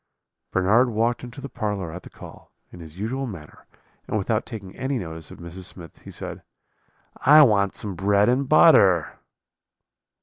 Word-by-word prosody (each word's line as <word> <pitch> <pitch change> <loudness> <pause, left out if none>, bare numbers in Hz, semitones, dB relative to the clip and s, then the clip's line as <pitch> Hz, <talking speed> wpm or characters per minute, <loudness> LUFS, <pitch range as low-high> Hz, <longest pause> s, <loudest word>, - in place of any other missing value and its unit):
"Bernard 110 +7 +3
walked 115 +2 -1
into 125 +3 -9
the 140 - -6
parlour 105 -9 -4
at 90 +3 -8
the - - -13
call, - - -14 0.2
in 90 - -12
his 80 0 -12
usual 130 +7 -3
manner, 85 -9 -11 0.4
and - - -1
without - - -1
taking 100 -4 -9
any 135 0 -2
notice 80 -6 -7
of - - -12
Mrs. 85 +2 -9
Smith, 85 -2 -11
he - - -12
said: - - -8 0.8
"'I 150 +2 +8
want 100 -6 +2
some 100 -2 -5
bread 100 +3 +2
and 130 +2 +1
butter.' 95 - +5
100 Hz, 165 wpm, -23 LUFS, 90-125 Hz, 0.8 s, I